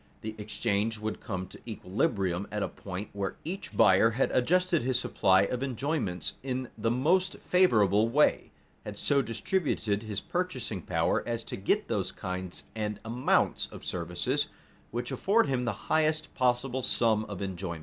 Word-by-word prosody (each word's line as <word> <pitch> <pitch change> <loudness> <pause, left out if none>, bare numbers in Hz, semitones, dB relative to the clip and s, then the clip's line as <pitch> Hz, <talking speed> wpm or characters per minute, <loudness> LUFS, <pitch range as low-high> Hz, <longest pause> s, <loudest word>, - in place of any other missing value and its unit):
The 110 0 -5
exchange 105 +1 -1
would 110 0 -4
come 95 -4 -4
to - - -14
equilibrium 100 - -1
at 105 -1 -1
a - - 0
point 95 +2 -7
where 100 -1 -3
each 185 +5 -6
buyer 95 +3 +6
had 120 +4 0
adjusted 180 +6 +2
his 125 +1 +1
supply 95 -5 +3
of 125 +5 -2
enjoyments 130 - -2
in 130 -1 -3
the 115 +1 0
most 170 +10 +2
favorable 110 - +4
way, 145 +5 +3 0.3
had 105 -1 -7
so 140 +4 +2
distributed 115 - -1
his 105 -3 -3
purchasing 130 - -3
power - - +1
as 115 -1 -2
to - - -6
get 95 - 0
those - - -1
kinds 90 -1 -5
and 105 -1 -2
amounts 120 +3 +1
of - - -11
services 90 - -1 0.4
which 120 +1 -4
afford 225 +4 +3
him 130 -2 0
the 115 - +1 0.2
highest 155 0 +2
possible 125 0 +1
sum 110 -3 +2
of 100 -4 -7
enjoyment. 95 -3 -4
115 Hz, 160 wpm, -29 LUFS, 100-135 Hz, 0.4 s, buyer